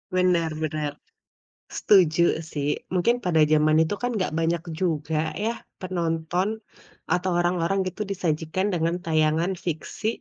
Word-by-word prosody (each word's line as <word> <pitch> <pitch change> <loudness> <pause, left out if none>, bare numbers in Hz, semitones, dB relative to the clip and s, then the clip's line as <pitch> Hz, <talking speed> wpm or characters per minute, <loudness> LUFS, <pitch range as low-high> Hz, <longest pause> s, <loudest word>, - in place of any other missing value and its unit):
Bener 180 -3 +2
bener. 155 -1 -2 0.9
Setuju 175 -5 +4 0.3
sih. 145 -1 -2 0.3
Mungkin 190 +6 +3
pada 165 -3 +3
zaman 155 0 +4
itu 160 - +1
kan 245 - 0
nggak 185 -5 -1
banyak 165 0 +1 0.2
juga 160 -4 -1 0.3
ya 230 - +1 0.3
penonton 175 0 -1 0.6
atau 180 +2 +1
orang-orang 175 +2 +1
gitu 185 +3 -6
disajikan 175 0 -1
dengan 165 0 0
tayangan 160 +1 +2
fiksi, 170 +5 -3
170 Hz, 125 wpm, -25 LUFS, 160-185 Hz, 0.9 s, Setuju